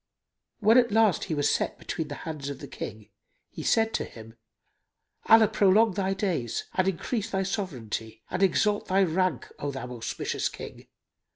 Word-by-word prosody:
When 220 +4 +6
at 235 -3 +2
last 220 -3 +3
he 165 - -2
was 145 -1 +2
set - - 0
between 160 -3 -4
the 145 - -6
hands 150 -3 -5
of 140 - -5
the - - -9
King 110 -1 -8 0.4
he - - -7
said 225 0 +2
to - - 0
him, 115 -1 -11 0.9
"Allah 225 -1 +8
prolong 205 +2 +4
thy 195 0 -1
days 170 - -1
and 185 0 +1
increase 195 +4 -2
thy 195 0 0
sovranty 125 - -4
and 185 - -2
exalt 205 +2 +2
thy 195 +1 +3
rank, 180 -5 0
O 145 - -2
thou 135 -2 -6
auspicious 115 -2 -2
King! - - -10
185 Hz, 170 wpm, -27 LUFS, 140-205 Hz, 0.9 s, Allah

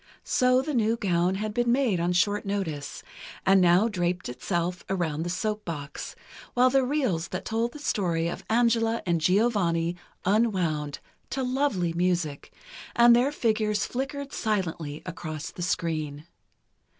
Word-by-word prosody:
So 255 +1 +3
the 300 - -3
new 230 -2 +2
gown 180 -2 +1
had 210 +2 -3
been 240 +1 +1
made 240 -8 +2
on 170 +1 +1
short 205 +3 +2
notice, 180 -8 -4 0.4
and 190 0 +5
now 180 +5 +5
draped 180 - -1
itself 175 +7 -2
around 170 -5 -1
the 175 - -2
soap 210 +4 -2
box, 150 -4 -6 0.4
while 250 +1 +5
the 270 0 +4
reels 250 - 0
that 185 - -5
told 230 +2 0
the - - -10
story 175 - 0
of 170 - -5
Angela 230 0 +2
and 170 -2 +1
Giovanni 180 -3 +2 0.3
unwound, 180 -8 +1 0.3
to 265 - -2
lovely 250 -10 0
music, 170 -4 -1 0.4
and 235 0 +7
their 250 +4 +3
figures 215 -5 0
flickered 275 +2 -4
silently 165 -8 -2
across 155 -3 -6
the - - -9
screen. 155 -4 -2
190 Hz, 145 wpm, -27 LUFS, 170-235 Hz, 0.4 s, and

